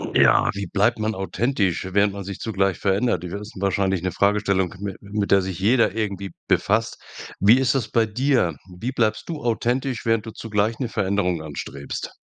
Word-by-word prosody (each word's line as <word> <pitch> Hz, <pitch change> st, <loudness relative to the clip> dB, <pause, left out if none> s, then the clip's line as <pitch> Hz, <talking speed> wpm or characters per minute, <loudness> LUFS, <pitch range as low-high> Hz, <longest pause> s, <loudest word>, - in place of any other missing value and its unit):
Ja, -, -, +5 dB
wie 100 Hz, 0 st, -3 dB
bleibt 105 Hz, +6 st, +2 dB
man 110 Hz, +1 st, 0 dB
authentisch, 95 Hz, -2 st, -1 dB
während 100 Hz, +1 st, +3 dB
man 100 Hz, -, -6 dB
sich 100 Hz, 0 st, -7 dB
zugleich 95 Hz, -4 st, 0 dB
verändert? 100 Hz, -2 st, +1 dB
Das 90 Hz, 0 st, -6 dB
ist 105 Hz, +1 st, -10 dB
wahrscheinlich 95 Hz, -2 st, +1 dB
'ne 95 Hz, +1 st, -1 dB
Fragestellung, 100 Hz, -3 st, +1 dB
mit 100 Hz, -1 st, -5 dB
mit 100 Hz, 0 st, -3 dB
der 100 Hz, -, +6 dB
sich 95 Hz, -2 st, -5 dB
jeder 115 Hz, +5 st, +3 dB
irgendwie 100 Hz, -3 st, -3 dB, 0.2 s
befasst. 110 Hz, +2 st, +1 dB, 0.4 s
Wie 110 Hz, +6 st, +6 dB
ist 135 Hz, -1 st, +2 dB
das 120 Hz, -5 st, -1 dB
bei 115 Hz, -1 st, +3 dB
dir? 120 Hz, -, +1 dB, 0.2 s
Wie 120 Hz, +6 st, -2 dB
bleibst 110 Hz, -3 st, 0 dB
du 160 Hz, -3 st, -5 dB
authentisch, 120 Hz, +2 st, -1 dB
während 115 Hz, -1 st, +1 dB
du 110 Hz, -, -6 dB
zugleich 110 Hz, 0 st, -1 dB
'ne 130 Hz, -, -1 dB
Veränderung 95 Hz, -6 st, 0 dB
anstrebst? 70 Hz, -2 st, -6 dB
100 Hz, 180 wpm, -23 LUFS, 95-115 Hz, 0.4 s, der